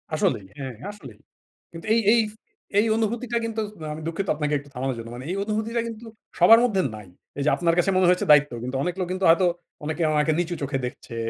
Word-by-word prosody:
আসলেই 100 Hz, -, 0 dB
হ্যাঁ, 130 Hz, -3 st, -6 dB, 0.2 s
আসলেই। 135 Hz, -, -13 dB, 0.5 s
কিন্তু 165 Hz, +3 st, -9 dB
এই, 230 Hz, -, +3 dB
এই -, -, +4 dB, 0.6 s
এই, 210 Hz, -, +3 dB
অনুভূতিটা 235 Hz, +2 st, -1 dB
কিন্তু 225 Hz, -1 st, -2 dB, 0.3 s
আমি 155 Hz, -, -7 dB
দুঃখিত 180 Hz, +4 st, -3 dB
আপনাকে 150 Hz, 0 st, -1 dB
একটু 145 Hz, +1 st, -15 dB
থামানোর 130 Hz, +1 st, -2 dB
জন্য। 115 Hz, 0 st, -8 dB
মানে 125 Hz, +2 st, -8 dB
এই -, -, -2 dB
অনুভূতিটা 220 Hz, +2 st, -1 dB
কিন্তু 230 Hz, 0 st, -8 dB, 0.3 s
সবার 225 Hz, 0 st, +8 dB
মধ্যে 200 Hz, -6 st, +1 dB
নাই। 105 Hz, -2 st, -11 dB, 0.3 s
এই -, -, 0 dB
যে -, -, +4 dB
আপনার 170 Hz, -1 st, +1 dB
কাছে 175 Hz, -, +2 dB
মনে 185 Hz, -1 st, +4 dB
হয়েছে 180 Hz, 0 st, +2 dB
দায়িত্ব, 150 Hz, -1 st, +6 dB
কিন্তু 130 Hz, +2 st, -3 dB
অনেক 180 Hz, -, -2 dB
লোক 185 Hz, -, -1 dB
কিন্তু 185 Hz, 0 st, -1 dB
হয়তো 170 Hz, +3 st, +5 dB, 0.4 s
অনেকে 155 Hz, +2 st, -2 dB
উনাকে 150 Hz, +1 st, +2 dB
নিচু 175 Hz, 0 st, -1 dB
চোখে 135 Hz, 0 st, -1 dB
দেখছে। 125 Hz, -1 st, -8 dB
170 Hz, 205 wpm, -24 LUFS, 140-215 Hz, 0.6 s, সবার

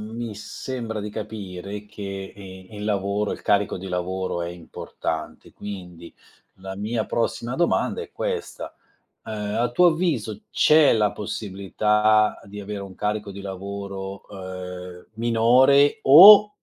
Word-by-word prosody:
mi 115 Hz, -2 st, -5 dB
sembra 110 Hz, +1 st, -6 dB
di 105 Hz, +1 st, -5 dB
capire 105 Hz, -2 st, -7 dB
che 100 Hz, -2 st, -7 dB
e 95 Hz, -2 st, -11 dB
il 105 Hz, -, -6 dB
lavoro, 100 Hz, 0 st, -1 dB
il -, -, -8 dB
carico 100 Hz, 0 st, +1 dB
di 95 Hz, +1 st, -7 dB
lavoro 90 Hz, 0 st, -3 dB
è 85 Hz, -, -4 dB
importante 85 Hz, -2 st, -6 dB
quindi 90 Hz, -4 st, -9 dB, 0.4 s
la 95 Hz, 0 st, -8 dB
mia 110 Hz, +2 st, -2 dB
prossima 120 Hz, +1 st, -2 dB
domanda 175 Hz, -, 0 dB
è 445 Hz, -, -11 dB
questa: 470 Hz, -3 st, -5 dB, 0.5 s
ehm, 105 Hz, -2 st, -4 dB
a 120 Hz, 0 st, +1 dB
tuo 180 Hz, +8 st, +5 dB
avviso 150 Hz, -, -1 dB
c'è 155 Hz, -1 st, +5 dB
la 105 Hz, -3 st, +2 dB
possibilità 105 Hz, +1 st, +1 dB
di 100 Hz, +1 st, -9 dB
avere 100 Hz, 0 st, -6 dB
un 95 Hz, -1 st, -10 dB
carico 105 Hz, 0 st, -3 dB
di 100 Hz, -, -9 dB
lavoro, 100 Hz, 0 st, -7 dB
ehm, 90 Hz, -2 st, -8 dB
minore, 120 Hz, +5 st, +4 dB
o 200 Hz, +9 st, +10 dB
105 Hz, 135 wpm, -23 LUFS, 95-115 Hz, 0.5 s, o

